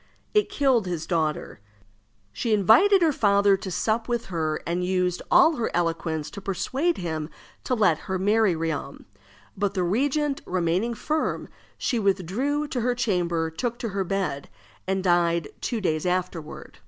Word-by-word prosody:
It 425 0 +3
killed 260 -8 +2
his 170 -3 -3
daughter. 155 - -2 0.7
She 230 - -1
invited 345 - +5
her 320 - +4
father 200 -5 +3
to 190 - -6
sup 220 +5 -1
with 240 -1 -1
her, 155 -2 -1
and 175 +1 -1
used 180 -1 0
all 320 -1 +5
her 235 - -1
eloquence 165 -2 -1
to 200 - -8
persuade 265 - -1
him 160 -3 -4 0.4
to 255 - +1
let 185 -8 +3
her 190 - 0
marry 205 0 +2
Riom; 160 -4 -4 0.5
but 200 0 -1
the 185 - +1
regent 275 - 0
remaining 185 +6 0
firm, 310 +7 -2 0.3
she 240 - -1
withdrew 215 - 0
to 250 - -2
her 245 +1 +1
chamber, 175 -8 0
took 235 +8 -3
to 235 -2 -4
her 195 -1 -1
bed, 185 -6 -3 0.4
and 190 0 0
died 170 -3 +2
two 235 - -2
days 160 -4 -1
afterward. 180 -3 -4
195 Hz, 155 wpm, -25 LUFS, 170-235 Hz, 0.7 s, invited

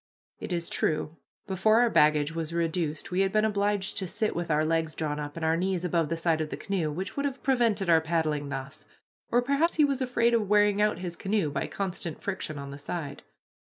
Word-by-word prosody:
It - - -6
is 170 -1 -1
true, 155 +1 -1 0.3
before 210 +4 +3
our 240 - +4
baggage 150 0 +3
was 165 0 -4
reduced 165 -2 -2
we 180 - 0
had 195 0 +2
been 215 +1 +3
obliged 205 -1 0
to 190 - -3
sit 215 +5 -1
with 170 0 -3
our 155 0 +2
legs 160 -1 0
drawn 150 -2 -2
up, 145 0 -6
and 165 - -2
our 160 +1 +3
knees 180 0 -1
above 165 -3 +1
the 165 - -1
side 165 -1 +1
of 155 - -3
the - - -5
canoe, 185 -6 -1
which 185 +6 -5
would 280 - -1
have 275 -2 -4
prevented 230 -7 +2
our 165 -1 +5
paddling 155 -3 -1
thus, 135 +1 -6 0.4
or 245 +1 +3
perhaps 280 +6 +1
he 305 - +5
was 275 -2 -1
afraid 240 -2 +2
of 215 -4 +1
wearing 205 -1 +4
out 210 -4 +2
his 175 -1 -4
canoe 195 -6 0
by 140 -1 -2
constant 180 -5 -4
friction 190 -6 -4
on 140 0 -7
the 140 - -8
side. 145 -1 -5
175 Hz, 225 wpm, -28 LUFS, 155-210 Hz, 0.4 s, our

